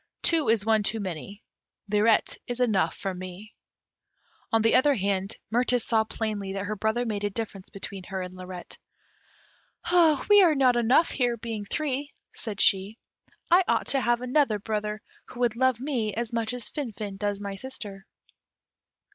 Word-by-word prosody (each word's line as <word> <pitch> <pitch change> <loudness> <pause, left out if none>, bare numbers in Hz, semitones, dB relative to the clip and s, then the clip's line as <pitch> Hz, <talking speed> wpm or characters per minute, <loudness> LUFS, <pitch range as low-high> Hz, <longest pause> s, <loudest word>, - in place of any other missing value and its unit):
Two 325 -6 +4
is 220 -2 +2
one 220 -1 +3
too 210 +2 -1
many 195 +2 -6 0.4
Lirette 210 +2 +2
is 245 0 -4
enough 195 -9 +1
for 195 -1 -3
me." 185 +3 -9 1.0
On 225 -1 +3
the 225 - +4
other 275 +3 +5
hand, 195 -2 -1
Mirtis 245 0 +2
saw 220 -2 +2
plainly 210 -3 -3
that 195 0 -3
her 215 +1 -3
brother 220 +4 0
made 210 -3 -3
a 205 - +1
difference 205 -2 -5
between 195 -1 -7
her 190 +1 -4
and 180 0 -8
Lirette. 185 -1 -9 1.5
"We 415 -1 +8
are 335 -5 +5
not 255 -3 +4
enough 240 +7 +3
here, 245 -3 0
being 220 -2 -5
three," 285 +3 -3 0.2
said 210 -4 -4
she. 195 +3 +2 0.5
"I 360 +2 +7
ought - - +1
to 270 - +2
have 240 0 +1
another 250 -3 +2
brother, 210 0 -3 0.2
who 245 - -9
would 235 -2 +2
love 260 -1 +2
me 240 -7 -2
as 235 +1 -3
much 230 0 -1
as 245 -3 -5
Finfin 215 -8 -5
does 205 0 -2
my 200 -1 -5
sister." 200 -4 -8
220 Hz, 165 wpm, -27 LUFS, 200-245 Hz, 1.5 s, We